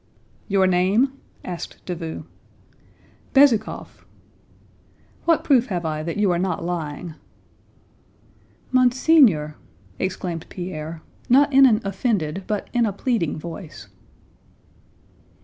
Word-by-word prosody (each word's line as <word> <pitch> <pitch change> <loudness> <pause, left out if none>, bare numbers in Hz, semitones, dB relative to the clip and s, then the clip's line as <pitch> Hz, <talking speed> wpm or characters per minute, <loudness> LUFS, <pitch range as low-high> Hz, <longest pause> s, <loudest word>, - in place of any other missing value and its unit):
"Your 195 -2 +3
name?" 190 +9 +2 0.3
asked 175 -2 -7
Davout. 165 -3 -5 1.1
"Bezúkhov." 270 -5 +2 1.2
"What 330 -2 +3
proof 255 -4 +3
have 175 -4 -3
I 155 -1 -2
that 165 +4 -4
you 205 -3 +2
are 170 - 0
not 180 -2 -2
lying?" 165 -1 -4 1.6
"Monseigneur!" 250 - +4 0.4
exclaimed 180 -3 -3
Pierre, 165 -3 -6 0.3
not 280 +3 +5
in 270 0 +8
an 220 -2 +3
offended 195 -4 -2
but 210 -2 -2
in 235 -2 +2
a - - -1
pleading 200 - -1
voice. 155 - -9
185 Hz, 100 wpm, -22 LUFS, 165-240 Hz, 1.6 s, in